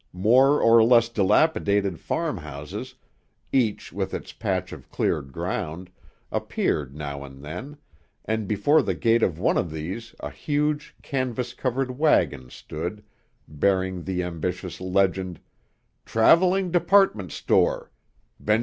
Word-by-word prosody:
More 130 Hz, +9 st, +5 dB
or 115 Hz, 0 st, +6 dB
less 115 Hz, 0 st, +5 dB
dilapidated 100 Hz, -, +2 dB
farm 165 Hz, -9 st, -2 dB
houses, 75 Hz, -2 st, -7 dB, 0.6 s
each 115 Hz, -6 st, 0 dB
with -, -, -3 dB
its -, -, -7 dB
patch -, -, -2 dB
of -, -, -12 dB
cleared 70 Hz, -3 st, -1 dB
ground, 85 Hz, +7 st, -4 dB, 0.4 s
appeared 70 Hz, -2 st, -1 dB
now 70 Hz, -2 st, -5 dB
and 70 Hz, 0 st, -12 dB
then, 105 Hz, -, -7 dB, 0.5 s
and 110 Hz, -2 st, -2 dB
before 125 Hz, +10 st, +3 dB
the 100 Hz, -7 st, -2 dB
gate 115 Hz, +8 st, +2 dB
of 85 Hz, -7 st, +1 dB
one 90 Hz, -, +2 dB
of 90 Hz, -, -2 dB
these 90 Hz, +9 st, -6 dB
a -, -, -6 dB
huge, 150 Hz, 0 st, -2 dB
canvas 125 Hz, -2 st, -2 dB
covered 130 Hz, 0 st, -2 dB
wagon 70 Hz, -, +2 dB
stood, 85 Hz, +11 st, -6 dB, 0.4 s
bearing 95 Hz, +4 st, 0 dB
the 90 Hz, 0 st, -2 dB
ambitious 90 Hz, +1 st, -4 dB
legend: 95 Hz, -1 st, 0 dB, 0.7 s
TRAVELING 180 Hz, +10 st, +4 dB
DEPARTMENT 175 Hz, -, +3 dB
STORE -, -, +1 dB, 0.5 s
BENJ. 105 Hz, +1 st, +3 dB
100 Hz, 125 wpm, -25 LUFS, 85-130 Hz, 0.7 s, or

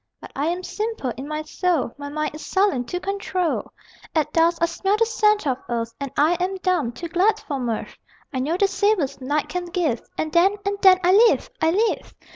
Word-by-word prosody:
But -, -, -11 dB
I 285 Hz, +3 st, -1 dB
am 355 Hz, +2 st, -2 dB
simple 425 Hz, -, -3 dB
in 270 Hz, +2 st, -7 dB
my 305 Hz, 0 st, -3 dB
soul; 320 Hz, -5 st, -1 dB
My 285 Hz, 0 st, -7 dB
mind 305 Hz, +1 st, -2 dB
is 305 Hz, -, -8 dB
sullen 380 Hz, -11 st, +1 dB
to 355 Hz, +9 st, -3 dB
control. 375 Hz, -3 st, -2 dB, 0.4 s
At 310 Hz, -2 st, +1 dB
dusk 335 Hz, +1 st, +3 dB
I 335 Hz, -, +4 dB
smell 385 Hz, +4 st, 0 dB
the 455 Hz, -, +3 dB
scent 425 Hz, -4 st, +2 dB
of 265 Hz, -2 st, 0 dB
earth, 230 Hz, -1 st, -2 dB
And 280 Hz, -1 st, -4 dB
I 320 Hz, +4 st, +4 dB
am 370 Hz, +2 st, -1 dB
dumb 350 Hz, -10 st, +1 dB
too 295 Hz, +8 st, -7 dB
glad 365 Hz, +6 st, +2 dB
for 280 Hz, -3 st, -4 dB
mirth. 235 Hz, -3 st, -3 dB, 0.4 s
I 260 Hz, -, -1 dB
know 305 Hz, +7 st, 0 dB
the 400 Hz, -, +4 dB
savors 380 Hz, -8 st, 0 dB
night 290 Hz, +3 st, -1 dB
can 360 Hz, -1 st, -3 dB
give, 340 Hz, -, -1 dB, 0.2 s
And 310 Hz, -, -2 dB
then, 370 Hz, +4 st, +4 dB
and 400 Hz, 0 st, -1 dB
then, 375 Hz, -2 st, +8 dB
I 360 Hz, -, +4 dB
live, 450 Hz, +3 st, +4 dB
I 320 Hz, -, +4 dB
live! 425 Hz, +7 st, 0 dB
340 Hz, 215 wpm, -23 LUFS, 285-390 Hz, 0.4 s, then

